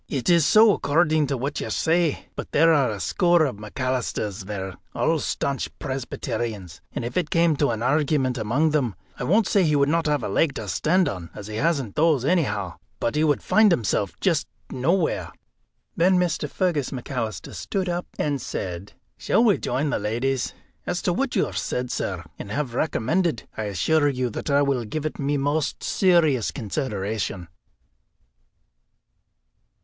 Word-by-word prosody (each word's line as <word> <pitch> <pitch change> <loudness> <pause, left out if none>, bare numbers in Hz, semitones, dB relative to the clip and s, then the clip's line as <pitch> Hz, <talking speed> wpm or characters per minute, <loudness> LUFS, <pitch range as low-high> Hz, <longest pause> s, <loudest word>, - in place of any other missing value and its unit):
"It 140 +4 0
is 170 -4 +5
so, 215 -1 +7
according 155 -2 +2
to 135 0 -1
what 140 +4 -3
you - - -4
say. 165 -1 +1
But - - -7
there 165 +2 +5
are 140 -5 +3
a 105 -2 -4
score 175 - +3
of 130 -8 -3
McAlisters 110 -3 -3
there, 95 -2 -5 0.2
all 165 -1 +1
staunch 140 -1 -2
Presbyterians, 115 - -4
and - - -4
if 120 - -4
it 175 -4 0
came 165 -2 +3
to 145 - +2
an 115 -1 -2
argument 135 -1 +1
among 135 +9 +1
them 130 -9 0 0.2
I 125 - -2
won't 210 - +3
say 195 0 +3
he 150 -3 +2
would 140 -1 +3
not 165 0 +1
have 145 -4 +1
a - - -1
leg 140 +8 +1
to 105 - -5
stand 175 - +2
on, 90 -4 -5
as 100 - -8
he 110 +1 -5
hasn't 140 -6 0
those 150 -5 +3
anyhow, 105 - 0 0.2
but 115 - 0
he 150 - +1
would 150 -3 +2
find 215 -2 +5
himself 105 - 0
just 170 -6 +1 0.2
nowhere." 160 +7 0 0.6
Then 185 +2 +4
Mr. 165 -4 0
Fergus 170 -8 0
McAlister 120 - -4
stood 190 -2 -3
up 175 0 -2
and 145 -3 -1
said: 90 0 -5 0.3
"Shall 230 - +2
we 215 -5 +4
join 140 +4 -1
the - - 0
ladies? 120 +5 -1 0.3
As 180 - -2
to 180 - +1
what 270 +7 -1
you - - +3
have - - -4
said, 125 0 -3
sir, - - -3 0.2
and - - -7
have 135 +1 -2
recommended, 155 +3 0
I 110 - -3
assure 145 - +2
you 125 -3 -1
that - - -5
I 140 0 +4
will 135 -4 0
give 145 +8 -4
it 155 - -4
my 145 +1 0
most 145 +2 -1
serious 165 - +3
consideration." 105 - -3
140 Hz, 175 wpm, -24 LUFS, 115-165 Hz, 0.6 s, so